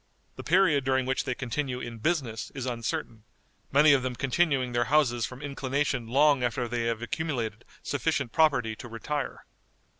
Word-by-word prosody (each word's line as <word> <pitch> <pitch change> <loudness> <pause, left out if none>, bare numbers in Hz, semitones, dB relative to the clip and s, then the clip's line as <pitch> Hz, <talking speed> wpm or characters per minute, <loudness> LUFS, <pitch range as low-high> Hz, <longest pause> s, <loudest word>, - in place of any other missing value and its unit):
The - - -8
period 165 -5 +3
during 130 -1 +1
which 135 +1 -1
they 125 - -1
continue 130 0 -3
in 120 -2 -7
business 125 -5 -1
is 135 -2 -4
uncertain, 115 -2 -4 0.5
many 145 +2 +6
of 135 - +3
them 125 -1 -3
continuing 135 -1 +1
their 120 0 +1
houses 125 -4 +2
from 130 +3 -10
inclination 135 -3 -1
long 140 +1 +4
after 120 0 -1
they 120 0 -2
have 115 0 -1
accumulated 120 -8 -3 0.2
sufficient 140 -2 -1
property 125 -7 +2
to 120 - -9
retire. 135 +5 -4
130 Hz, 160 wpm, -28 LUFS, 120-145 Hz, 0.5 s, many